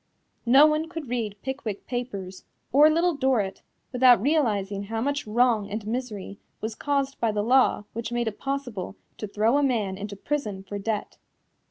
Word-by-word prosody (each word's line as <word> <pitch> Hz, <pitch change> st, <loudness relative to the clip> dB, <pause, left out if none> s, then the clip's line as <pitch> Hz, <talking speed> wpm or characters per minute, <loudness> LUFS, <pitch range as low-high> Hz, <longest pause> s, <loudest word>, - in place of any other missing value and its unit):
No 270 Hz, +5 st, +8 dB
one 310 Hz, +1 st, +1 dB
could 325 Hz, -6 st, -7 dB
read 225 Hz, -4 st, -2 dB
Pickwick 250 Hz, -6 st, -4 dB
Papers 200 Hz, -7 st, -5 dB, 0.3 s
or 295 Hz, +3 st, +7 dB
Little 335 Hz, +3 st, +2 dB
Dorrit 255 Hz, -8 st, 0 dB, 0.3 s
without 250 Hz, -3 st, +6 dB
realizing 205 Hz, -7 st, 0 dB
how 225 Hz, +2 st, -3 dB
much 285 Hz, +1 st, -1 dB
wrong 225 Hz, -2 st, +2 dB
and 215 Hz, +1 st, -4 dB
misery 215 Hz, -4 st, -5 dB, 0.2 s
was 220 Hz, +1 st, -4 dB
caused 275 Hz, +2 st, -1 dB
by 230 Hz, -2 st, +1 dB
the 210 Hz, -1 st, -1 dB
law 255 Hz, -2 st, +3 dB
which 230 Hz, 0 st, -4 dB
made 240 Hz, -1 st, -1 dB
it 210 Hz, -, -4 dB
possible 245 Hz, -, -4 dB, 0.2 s
to 215 Hz, -, -4 dB
throw 220 Hz, +7 st, +2 dB
a -, -, +1 dB
man 210 Hz, -8 st, 0 dB
into 205 Hz, 0 st, -6 dB
prison 210 Hz, -5 st, -3 dB
for 200 Hz, +1 st, -6 dB
debt. 210 Hz, +1 st, -3 dB
235 Hz, 170 wpm, -26 LUFS, 205-270 Hz, 0.3 s, No